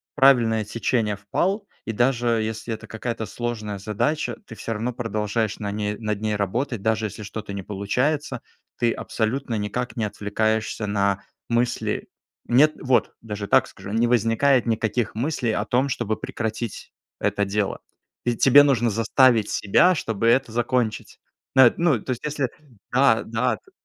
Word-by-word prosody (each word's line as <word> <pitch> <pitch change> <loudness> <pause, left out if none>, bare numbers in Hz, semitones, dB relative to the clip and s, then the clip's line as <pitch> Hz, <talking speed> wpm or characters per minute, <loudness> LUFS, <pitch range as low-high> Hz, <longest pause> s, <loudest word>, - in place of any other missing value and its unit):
правильное 120 -6 +4
течение 105 0 0
впал, 190 - -1 0.2
и 115 - -3
даже 120 +1 +1 0.2
если 110 +1 -4
это 110 - -8
какая-то 115 0 -4
сложная 110 -2 -4
задача, 115 +5 -1
ты 115 - -10
всё 115 - -4
равно 115 +3 -2
продолжаешь 110 -1 -2
на 100 -1 -3
ней 105 0 -2
над 105 -2 -2
ней 110 -1 0
работать, 110 +3 -2
даже 110 0 +1
если 105 +1 -6
что-то 105 0 -6
не 100 - -5
получается, 125 +10 -1 0.4
ты 120 -1 +2
абсолютно 115 +2 -2
никак 105 +4 -3
не 115 - -1
отвлекаешься 110 +1 -1
на 100 -1 0 0.3
мысли. 120 +1 -1 0.4
Нет. 150 +6 +5
Вот, 130 -2 +2
даже 105 -2 -5
так - - +4
скажу, 100 - -10
не 115 +2 +2
возникает 120 +3 +3
никаких 115 0 0
мыслей 125 -1 -1
о 105 - 0
том, 130 +4 +1
чтобы 110 -4 -1
прекратить 110 -1 -5 0.3
это 105 0 0
дело. 100 0 -1 0.5
Ведь 120 -1 -1
тебе 140 +2 +8
нужно 125 -5 +2
заставить 115 +1 +3
себя, 145 - +4
чтобы 115 -5 -1
это 130 0 +3
закончить. 120 -1 -1 0.4
Нет, 130 -3 +7
ну, 160 -9 +3
то - - -3
есть 125 - -4
если 145 -4 -1 0.4
Да 125 -3 +4
да 115 +3 0
т 390 - -25
115 Hz, 155 wpm, -24 LUFS, 105-125 Hz, 0.5 s, тебе